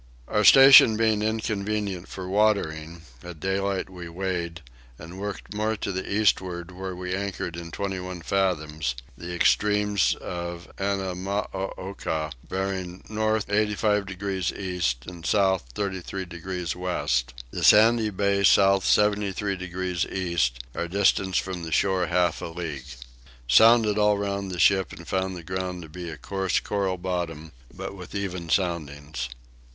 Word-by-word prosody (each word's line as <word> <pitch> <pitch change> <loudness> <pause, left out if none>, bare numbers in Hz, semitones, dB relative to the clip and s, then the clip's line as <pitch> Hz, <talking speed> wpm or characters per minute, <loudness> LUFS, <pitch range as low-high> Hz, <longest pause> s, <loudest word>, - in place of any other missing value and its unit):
Our 105 - +1
station 135 -2 +9
being 110 -2 +2
inconvenient 105 -3 -2
for 95 -1 -7
watering 85 -6 0 0.2
at 90 -3 -9
daylight 95 +2 -1
we 90 -2 -9
weighed, 85 -2 -3 0.4
and 85 +4 -10
worked 105 +1 -6
more 110 +1 0
to 100 - -3
the 95 0 -4
eastward 90 -4 +1
where 95 0 -6
we 90 0 -4
anchored 95 -3 -3
in 85 -1 -7
twenty 95 +2 -3
one 90 -2 -7
fathoms; 80 -8 -1 0.2
the 85 +7 -7
extremes 105 +1 +2
of 85 0 -6
Annamooka 95 -4 -3 0.2
bearing 95 -1 -3
north 110 0 0
85 105 0 +1
degrees 95 -1 -2
east 90 -11 -2
and 85 -2 -9
south 95 -3 +2
33 95 -1 -3
degrees 85 0 -5
west; 65 -9 -1 0.2
the - - -4
Sandy 110 +1 +6
bay 100 0 +1
south 100 -1 +5
73 105 -1 +2
degrees 90 -1 -3
east; 85 -10 -1
our 85 - -3
distance 95 0 +2
from 95 -2 -2
the 80 -1 -6
shore 95 0 +2
half 90 0 +1
a - - -4
league. 80 -6 -6 0.6
Sounded 110 - +6
all 105 0 +4
round 100 -1 -2
the 90 - -5
ship 95 +1 +3
and - - -11
found 95 0 -1
the 85 - -9
ground 90 0 -4
to 80 - -11
be 85 +2 -7
a 80 - -7
coarse 95 -1 -1
coral 100 -2 -1
bottom, 85 -4 -4 0.2
but - - -7
with 90 0 -10
even 90 -4 -4
soundings. 75 -7 -2
95 Hz, 145 wpm, -25 LUFS, 85-100 Hz, 0.6 s, station